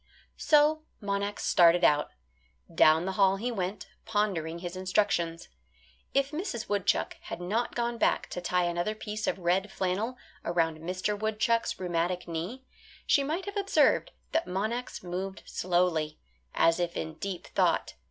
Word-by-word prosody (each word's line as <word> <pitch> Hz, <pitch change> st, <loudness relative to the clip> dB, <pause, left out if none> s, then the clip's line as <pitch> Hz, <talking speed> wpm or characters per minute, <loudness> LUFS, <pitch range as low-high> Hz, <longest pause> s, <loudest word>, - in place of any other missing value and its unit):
So 305 Hz, +1 st, +4 dB, 0.2 s
Monax 200 Hz, 0 st, -2 dB
started 175 Hz, 0 st, +5 dB
out. 150 Hz, -2 st, +4 dB, 0.6 s
Down 160 Hz, +2 st, +5 dB
the 190 Hz, -, -1 dB
hall 195 Hz, 0 st, +4 dB
he 235 Hz, +5 st, -2 dB
went, 195 Hz, -2 st, -3 dB, 0.2 s
pondering 195 Hz, -7 st, -1 dB
his 175 Hz, +1 st, -6 dB
instructions. 185 Hz, -3 st, 0 dB, 0.6 s
If 275 Hz, +1 st, +1 dB
Mrs. 300 Hz, -, -4 dB
Woodchuck 205 Hz, -2 st, 0 dB
had -, -, -5 dB
not 215 Hz, +7 st, -1 dB
gone 235 Hz, -1 st, -1 dB
back -, -, +2 dB
to 180 Hz, -, -4 dB
tie 180 Hz, 0 st, +1 dB
another 175 Hz, +5 st, -1 dB
piece 215 Hz, 0 st, -4 dB
of -, -, 0 dB
red 185 Hz, +3 st, +1 dB
flannel 200 Hz, +7 st, -1 dB, 0.3 s
around 165 Hz, -2 st, 0 dB
Mr. 185 Hz, +5 st, -2 dB
Woodchuck's 220 Hz, +2 st, 0 dB
rheumatic 175 Hz, 0 st, -1 dB
knee, 175 Hz, +11 st, -4 dB, 0.4 s
she 280 Hz, -, +4 dB
might 320 Hz, +7 st, -2 dB
have 405 Hz, +1 st, -5 dB
observed 400 Hz, 0 st, +3 dB, 0.2 s
that 325 Hz, -, 0 dB
Monax 220 Hz, +7 st, -3 dB
moved 190 Hz, +2 st, -5 dB
slowly, 175 Hz, -4 st, 0 dB, 0.4 s
as 165 Hz, +1 st, +4 dB
if 175 Hz, -1 st, -1 dB
in 160 Hz, -, -4 dB
deep 195 Hz, -3 st, -4 dB
thought. -, -, +1 dB
190 Hz, 145 wpm, -29 LUFS, 175-225 Hz, 0.6 s, started